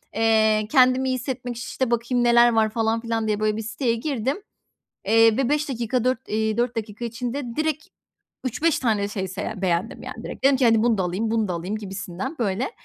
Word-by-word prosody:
Eee, 220 Hz, -1 st, +3 dB
kendimi 260 Hz, -1 st, +4 dB
iyi -, -, +1 dB
hissetmek, 245 Hz, -1 st, -4 dB
işte, 240 Hz, +1 st, -3 dB
“Bakayım 240 Hz, +1 st, +1 dB
neler 240 Hz, 0 st, +6 dB
var?” 220 Hz, -1 st, +3 dB
falan 225 Hz, +1 st, 0 dB
filan 225 Hz, -1 st, -2 dB
diye 210 Hz, -1 st, 0 dB
böyle 215 Hz, 0 st, 0 dB
bir 220 Hz, -, -2 dB
siteye 230 Hz, +2 st, -1 dB
girdim, 265 Hz, -, -2 dB, 0.7 s
eee, 225 Hz, 0 st, +5 dB
be 265 Hz, -2 st, +1 dB
5 300 Hz, 0 st, 0 dB
dakika, 240 Hz, -1 st, -1 dB
4, 255 Hz, 0 st, -1 dB
eee, 220 Hz, 0 st, 0 dB
4 240 Hz, 0 st, 0 dB
dakika 220 Hz, +1 st, -5 dB
içinde 240 Hz, +1 st, -4 dB
direkt 310 Hz, -1 st, -1 dB, 0.6 s
3-5 300 Hz, +6 st, 0 dB
tane 215 Hz, -5 st, +1 dB
şey 195 Hz, -2 st, -4 dB
se 190 Hz, +2 st, -6 dB
ye 210 Hz, -3 st, -5 dB
beğendim, 185 Hz, +3 st, -1 dB
yani, -, -, -8 dB
direkt. -, -, -8 dB
Dedim 275 Hz, 0 st, +6 dB
ki, 255 Hz, -, +2 dB
hani, 225 Hz, -1 st, +4 dB
“Bunu 235 Hz, -3 st, +3 dB
da 190 Hz, -, 0 dB
alayım, 200 Hz, +6 st, -2 dB
bunu 220 Hz, -3 st, +1 dB
da 180 Hz, -, -2 dB
alayım.” 180 Hz, +5 st, -3 dB
gibisinden, 195 Hz, -, -6 dB
böyle. 220 Hz, -, -1 dB
230 Hz, 205 wpm, -23 LUFS, 215-250 Hz, 0.7 s, neler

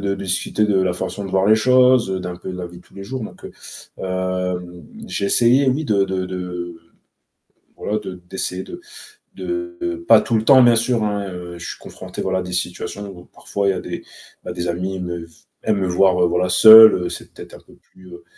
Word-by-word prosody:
de 100 Hz, 0 st, -1 dB
discuter 95 Hz, +3 st, 0 dB
de 95 Hz, -2 st, +2 dB
la 90 Hz, -1 st, 0 dB
façon 100 Hz, +3 st, -5 dB
de 95 Hz, -, -6 dB
voir 95 Hz, +1 st, +1 dB
les 110 Hz, -, +6 dB
choses 125 Hz, -1 st, +4 dB
heu, 95 Hz, -, -2 dB
d'un 90 Hz, -1 st, -6 dB
peu 90 Hz, -, -8 dB
de 90 Hz, -, -7 dB
la 90 Hz, -, -5 dB
vie 85 Hz, 0 st, -12 dB
de -, -, -19 dB
tous -, -, -25 dB
les 100 Hz, -, -8 dB
jours, 130 Hz, +3 st, -6 dB
donc -, -, -10 dB
heu -, -, -9 dB, 0.5 s
hem 90 Hz, -1 st, -4 dB, 0.2 s
j'ai 100 Hz, -, -3 dB
essayé, 125 Hz, +6 st, +4 dB
oui 140 Hz, +5 st, 0 dB
de 100 Hz, -7 st, +1 dB
de 90 Hz, -2 st, -5 dB, 1.0 s
voilà 105 Hz, +1 st, -3 dB
de 95 Hz, -3 st, -8 dB
d'essayer 95 Hz, -1 st, -4 dB
de 350 Hz, -, -10 dB, 0.6 s
de 345 Hz, -1 st, -5 dB
pas -, -, +8 dB
tout 115 Hz, -, -2 dB
le 110 Hz, -, +1 dB
temps, 130 Hz, +2 st, +7 dB
bien 120 Hz, -1 st, +5 dB
sûr, 115 Hz, -1 st, +1 dB
hein, 100 Hz, -2 st, -2 dB
heu, 90 Hz, -1 st, -8 dB
je 85 Hz, -, -9 dB
suis -, -, -7 dB
confronté, -, -, -9 dB
voilà, 95 Hz, 0 st, -1 dB
à -, -, -2 dB
des 90 Hz, 0 st, -7 dB
situations 90 Hz, +3 st, -4 dB
où 90 Hz, -3 st, -11 dB
parfois 100 Hz, -1 st, -4 dB
il -, -, +3 dB
y -, -, -1 dB
a -, -, -4 dB
des -, -, -7 dB, 0.4 s
bah, -, -, -6 dB
des 90 Hz, 0 st, -4 dB
amis 90 Hz, +2 st, -3 dB
me 85 Hz, -1 st, -5 dB
v 85 Hz, -, -21 dB, 0.3 s
aiment 110 Hz, -2 st, +1 dB
me 95 Hz, -, -1 dB
voir 90 Hz, +1 st, +3 dB
voilà, 90 Hz, +1 st, 0 dB
seul 110 Hz, +3 st, +9 dB
heu, 90 Hz, -1 st, -3 dB
c'est -, -, -9 dB
peut-être -, -, -12 dB
un -, -, -11 dB
peu -, -, -21 dB
plus 95 Hz, 0 st, -21 dB
heu 85 Hz, 0 st, -12 dB
95 Hz, 230 wpm, -20 LUFS, 90-110 Hz, 1.0 s, seul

